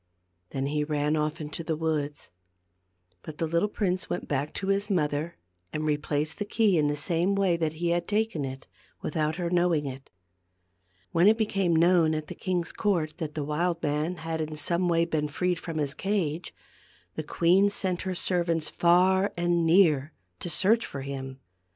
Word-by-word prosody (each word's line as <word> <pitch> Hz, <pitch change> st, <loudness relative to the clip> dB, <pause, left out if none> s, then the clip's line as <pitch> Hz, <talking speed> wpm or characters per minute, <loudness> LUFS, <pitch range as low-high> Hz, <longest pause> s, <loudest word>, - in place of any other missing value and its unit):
Then 135 Hz, 0 st, -3 dB
he 150 Hz, +1 st, 0 dB
ran 150 Hz, 0 st, 0 dB
off 155 Hz, +2 st, -1 dB
into 155 Hz, +1 st, -5 dB
the 160 Hz, -1 st, -1 dB
woods. 150 Hz, -, -2 dB, 0.9 s
But 155 Hz, -1 st, -9 dB
the 165 Hz, -, 0 dB
little 170 Hz, +6 st, +1 dB
prince 185 Hz, -3 st, -1 dB
went 175 Hz, -, -3 dB
back 140 Hz, +1 st, -1 dB
to 195 Hz, -, -3 dB
his 200 Hz, +1 st, +1 dB
mother 155 Hz, -2 st, -1 dB, 0.3 s
and 155 Hz, -, -3 dB
replaced 150 Hz, +2 st, -1 dB
the -, -, 0 dB
key 205 Hz, -4 st, +2 dB
in 150 Hz, -, +2 dB
the 145 Hz, -, 0 dB
same 170 Hz, +6 st, 0 dB
way 195 Hz, -3 st, +2 dB
that 160 Hz, -2 st, -1 dB
he 170 Hz, +2 st, -2 dB
had 175 Hz, 0 st, 0 dB
taken 210 Hz, -7 st, 0 dB
it, 135 Hz, 0 st, -6 dB, 0.4 s
without 155 Hz, 0 st, -1 dB
her 175 Hz, -1 st, -3 dB
knowing 175 Hz, -4 st, +2 dB
it. 135 Hz, 0 st, -7 dB, 1.0 s
When 170 Hz, +4 st, +4 dB
it 220 Hz, +1 st, +5 dB
became 195 Hz, -6 st, +1 dB
known 165 Hz, -1 st, +4 dB
at 155 Hz, 0 st, -3 dB
the -, -, -4 dB
king's 180 Hz, -2 st, -2 dB
court 170 Hz, -7 st, -1 dB
that 160 Hz, -4 st, -5 dB
the 150 Hz, -, -2 dB
wild 165 Hz, +4 st, -1 dB
man 150 Hz, +4 st, 0 dB
had 160 Hz, -1 st, -4 dB
in 155 Hz, 0 st, -4 dB
some 175 Hz, +3 st, +2 dB
way 165 Hz, 0 st, +3 dB
been 155 Hz, -3 st, -1 dB
freed 180 Hz, +4 st, -1 dB
from 165 Hz, -2 st, -5 dB
his 145 Hz, -2 st, -1 dB
cage, 175 Hz, -5 st, -2 dB, 0.6 s
the -, -, -3 dB
queen 180 Hz, +6 st, +3 dB
sent 185 Hz, -3 st, 0 dB
her 185 Hz, -1 st, -3 dB
servants 170 Hz, -3 st, 0 dB
far 185 Hz, +3 st, +3 dB
and 175 Hz, -1 st, +1 dB
near 160 Hz, -4 st, +4 dB, 0.3 s
to -, -, -5 dB
search 220 Hz, +7 st, +3 dB
for 140 Hz, -, -6 dB
him. 135 Hz, -1 st, -6 dB
165 Hz, 180 wpm, -27 LUFS, 150-180 Hz, 1.0 s, it